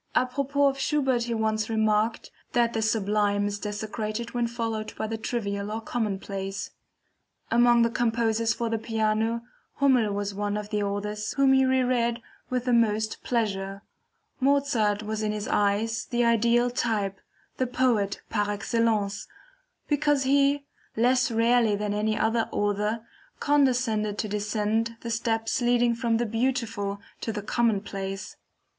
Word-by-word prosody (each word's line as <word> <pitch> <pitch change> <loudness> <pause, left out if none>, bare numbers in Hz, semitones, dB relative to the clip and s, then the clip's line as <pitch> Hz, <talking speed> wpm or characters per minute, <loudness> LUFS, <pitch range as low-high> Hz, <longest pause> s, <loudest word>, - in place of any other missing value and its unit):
Apropos 280 +3 +1
of 275 -1 +2
Schubert 265 -5 +1
he 235 -1 -2
once 220 0 0
remarked: 220 0 +1 0.2
"that 235 -1 +2
the 225 - 0
sublime 205 -2 +1
is 205 0 -2
desecrated 215 +2 -4
when 240 -1 0
followed 225 -2 -4
by - - -3
the 225 +1 -3
trivial 200 -3 -3
or 220 - -2
commonplace." 195 -3 -3 0.8
Among 240 0 +5
the 230 - +1
composers 225 -1 +1
for 230 +1 -1
the 225 -1 -1
piano 225 +1 0 0.3
Hummel 255 -6 +3
was 200 0 -2
one 205 +1 -2
of 210 0 -6
the 210 -1 0
authors 210 +1 -3
whom 275 -1 +4
he 265 0 +5
reread 250 -2 +1 0.3
with 250 -1 -1
the 250 - +2
most 220 -2 +1
pleasure. 195 -4 -2 0.6
Mozart 260 -7 +2
was 215 0 -3
in 215 -1 0
his 210 0 -4
eyes 210 +3 +1
the 240 -1 +1
ideal 235 +1 +3
type, 210 -6 -1 0.4
the 255 - 0
Poet 235 -6 +1
par 205 -2 0
excellence, 205 -1 0 0.6
because 290 -1 +2
he, 280 +1 +3 0.3
less 250 +3 +3
rarely 230 -1 +3
than 205 0 -2
any 215 +1 0
other 225 +1 +1
author, 210 +2 -1 0.3
condescended 245 -7 +2
to 215 - -2
descend 210 +2 -1
the 235 - -4
steps 225 +1 0
leading 240 0 +3
from 230 -1 0
the 240 - 0
beautiful 225 -3 -1 0.2
to 225 - -3
the 210 -1 -5
commonplace. 195 -4 -1
225 Hz, 145 wpm, -26 LUFS, 210-240 Hz, 0.8 s, Among